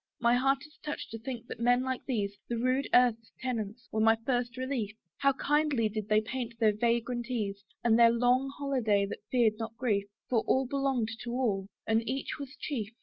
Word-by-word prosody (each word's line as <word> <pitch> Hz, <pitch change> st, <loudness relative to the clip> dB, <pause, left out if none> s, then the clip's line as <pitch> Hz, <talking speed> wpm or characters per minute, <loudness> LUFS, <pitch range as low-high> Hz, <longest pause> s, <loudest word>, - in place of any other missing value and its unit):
My 235 Hz, 0 st, +4 dB
heart 270 Hz, +3 st, +2 dB
is 305 Hz, 0 st, -19 dB
touched 300 Hz, -1 st, -5 dB
to 225 Hz, -, -6 dB
think 240 Hz, 0 st, -6 dB
that -, -, -8 dB
men 245 Hz, +1 st, +3 dB
like 260 Hz, -1 st, -2 dB
these, 205 Hz, -6 st, -1 dB
The 240 Hz, -, 0 dB
rude 255 Hz, +3 st, +1 dB
earth's 235 Hz, -2 st, +3 dB
tenants, 235 Hz, -2 st, -4 dB
were 220 Hz, -, -1 dB
my 225 Hz, +1 st, +6 dB
first 245 Hz, -2 st, 0 dB
relief: 255 Hz, -5 st, -2 dB, 0.2 s
How 275 Hz, 0 st, +4 dB
kindly 290 Hz, -5 st, +1 dB
did 215 Hz, -1 st, -4 dB
they 215 Hz, 0 st, +4 dB
paint 235 Hz, 0 st, -5 dB
their 215 Hz, -2 st, +4 dB
vagrant 235 Hz, +2 st, 0 dB
ease! 205 Hz, -5 st, -2 dB, 0.2 s
And 230 Hz, -1 st, +4 dB
their 235 Hz, 0 st, +8 dB
long 245 Hz, +3 st, +2 dB
holiday 240 Hz, -8 st, +1 dB
that 200 Hz, -, -6 dB
feared 230 Hz, -4 st, +2 dB
not 225 Hz, 0 st, -5 dB
grief, 205 Hz, -6 st, 0 dB, 0.2 s
For 235 Hz, -3 st, +2 dB
all 265 Hz, 0 st, +3 dB
belonged 265 Hz, -4 st, 0 dB
to 245 Hz, -, -6 dB
all, 210 Hz, -7 st, 0 dB, 0.2 s
and 225 Hz, 0 st, +2 dB
each 270 Hz, +3 st, -3 dB
was 280 Hz, 0 st, -8 dB
chief. 230 Hz, -9 st, -3 dB
240 Hz, 200 wpm, -30 LUFS, 220-260 Hz, 0.2 s, their